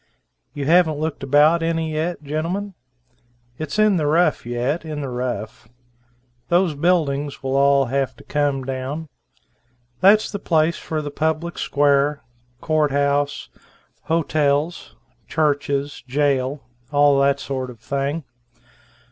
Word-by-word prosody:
You 145 Hz, -1 st, -3 dB
haven't 160 Hz, -1 st, +4 dB
looked 155 Hz, 0 st, -3 dB
about 150 Hz, +5 st, +4 dB
any 165 Hz, -1 st, -1 dB
yet, 160 Hz, +1 st, -2 dB
gentlemen? 170 Hz, +7 st, -3 dB, 0.9 s
It's 155 Hz, +4 st, -4 dB
in 215 Hz, -3 st, +4 dB
the 150 Hz, -3 st, 0 dB
rough 160 Hz, -5 st, +2 dB
yet, 125 Hz, +7 st, -1 dB
in 155 Hz, -2 st, -5 dB
the 140 Hz, -, -4 dB
rough. 120 Hz, -4 st, -4 dB, 0.8 s
Those 175 Hz, -1 st, +2 dB
buildings 145 Hz, -4 st, 0 dB
will 135 Hz, 0 st, -1 dB
all 140 Hz, 0 st, +4 dB
have 135 Hz, 0 st, -1 dB
to -, -, -16 dB
come 145 Hz, -2 st, -1 dB
down. 135 Hz, +4 st, -4 dB, 0.9 s
That's 205 Hz, +3 st, +5 dB
the 205 Hz, -, -4 dB
place 160 Hz, -1 st, +1 dB
for 155 Hz, -2 st, -4 dB
the 145 Hz, -, -5 dB
public 160 Hz, +3 st, -2 dB
square, 145 Hz, 0 st, +2 dB, 0.4 s
Court 155 Hz, -1 st, +1 dB
House, 140 Hz, +1 st, 0 dB, 0.6 s
hotels, 150 Hz, -, 0 dB, 0.3 s
churches, 145 Hz, -2 st, -1 dB
jail 140 Hz, 0 st, 0 dB, 0.3 s
all 145 Hz, -1 st, +4 dB
that 140 Hz, 0 st, +3 dB
sort 130 Hz, -2 st, -4 dB
of 120 Hz, -3 st, -12 dB
thing. 140 Hz, +6 st, -2 dB
145 Hz, 125 wpm, -21 LUFS, 140-160 Hz, 0.9 s, That's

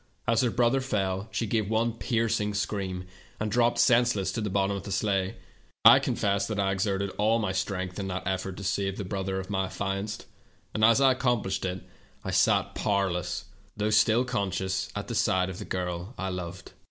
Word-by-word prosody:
As 115 Hz, -1 st, +3 dB
her 125 Hz, -, +2 dB
brother 120 Hz, +3 st, +2 dB
fell 100 Hz, -5 st, -1 dB
she 115 Hz, -, -2 dB
gave 110 Hz, -1 st, 0 dB
one 115 Hz, +1 st, +1 dB
piercing 115 Hz, -3 st, 0 dB
scream 95 Hz, -3 st, -2 dB, 0.3 s
and 105 Hz, 0 st, -2 dB
dropped 120 Hz, +1 st, +3 dB
senseless 115 Hz, -6 st, +3 dB
to 115 Hz, -, -3 dB
the 105 Hz, -, -2 dB
bottom 100 Hz, +1 st, +1 dB
of 100 Hz, -, -4 dB
the 100 Hz, -, -8 dB
sleigh. 95 Hz, -1 st, 0 dB, 0.5 s
I -, -, +10 dB
confess 100 Hz, 0 st, 0 dB
that 110 Hz, -2 st, -3 dB
I 95 Hz, -1 st, +2 dB
exerted 95 Hz, 0 st, -1 dB
all 110 Hz, +2 st, +3 dB
my 105 Hz, -4 st, -1 dB
strength 95 Hz, -1 st, -3 dB
in 95 Hz, -, -3 dB
that 95 Hz, 0 st, -4 dB
effort 95 Hz, 0 st, -2 dB
to 100 Hz, -, -7 dB
save 95 Hz, 0 st, -1 dB
the 100 Hz, -, -4 dB
brother 95 Hz, 0 st, -2 dB
of 95 Hz, +2 st, -7 dB
my 95 Hz, -1 st, 0 dB
affianced, 100 Hz, +2 st, -4 dB, 0.5 s
and 110 Hz, -, -1 dB
as 115 Hz, +3 st, +6 dB
I 135 Hz, -1 st, +6 dB
accomplished 120 Hz, -8 st, 0 dB
it, 90 Hz, 0 st, -3 dB, 0.4 s
I -, -, -3 dB
sank -, -, +3 dB
powerless, 90 Hz, -3 st, -1 dB, 0.3 s
though 105 Hz, +1 st, 0 dB
still 110 Hz, +3 st, +4 dB
conscious, 95 Hz, -5 st, -2 dB
at 105 Hz, -, -4 dB
the 120 Hz, -, -4 dB
side 95 Hz, -4 st, +1 dB
of 95 Hz, -, -8 dB
the 105 Hz, -, -6 dB
girl 90 Hz, +4 st, -4 dB
I 95 Hz, -, -2 dB
loved. 90 Hz, -1 st, -6 dB
100 Hz, 195 wpm, -28 LUFS, 95-110 Hz, 0.5 s, I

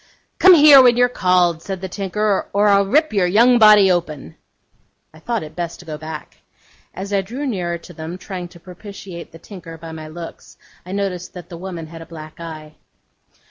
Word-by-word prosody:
'Come 375 Hz, -1 st, +8 dB
here, 290 Hz, -3 st, +8 dB
when 245 Hz, -2 st, +4 dB
you're 245 Hz, -, +5 dB
called,' 180 Hz, -7 st, +1 dB
said 190 Hz, +1 st, -6 dB
the 190 Hz, -, -5 dB
tinker, 200 Hz, +2 st, -2 dB
'or 205 Hz, +1 st, +3 dB
I'll 200 Hz, -1 st, +3 dB
rip 305 Hz, +4 st, +2 dB
your 190 Hz, -4 st, +2 dB
young 235 Hz, +6 st, +4 dB
body 210 Hz, -3 st, +7 dB
open.' 155 Hz, -, -3 dB, 0.8 s
I 155 Hz, -, -16 dB
thought 230 Hz, +4 st, -3 dB
it 155 Hz, -, -11 dB
best 170 Hz, -1 st, -5 dB
to 180 Hz, -, -13 dB
go 155 Hz, -2 st, -6 dB
back. 155 Hz, 0 st, -9 dB, 0.5 s
As 195 Hz, +2 st, -7 dB
I 200 Hz, -, +2 dB
drew 245 Hz, +10 st, -6 dB
nearer 180 Hz, -9 st, -2 dB
to 175 Hz, +1 st, -14 dB
them, 160 Hz, +2 st, -7 dB
trying 185 Hz, -1 st, -7 dB
to 175 Hz, 0 st, -17 dB
propitiate 185 Hz, -1 st, -11 dB
the 165 Hz, -, -13 dB
tinker 170 Hz, -2 st, -11 dB
by 165 Hz, 0 st, -10 dB
my 155 Hz, -1 st, -8 dB
looks, 165 Hz, +2 st, -11 dB, 0.3 s
I -, -, -10 dB
observed 190 Hz, -2 st, -4 dB
that 180 Hz, -1 st, -10 dB
the 175 Hz, -, -8 dB
woman 175 Hz, -2 st, -7 dB
had 165 Hz, +1 st, -11 dB
a 165 Hz, -, -11 dB
black 155 Hz, -1 st, -11 dB
eye. 155 Hz, -2 st, -9 dB
180 Hz, 200 wpm, -19 LUFS, 165-205 Hz, 0.8 s, Come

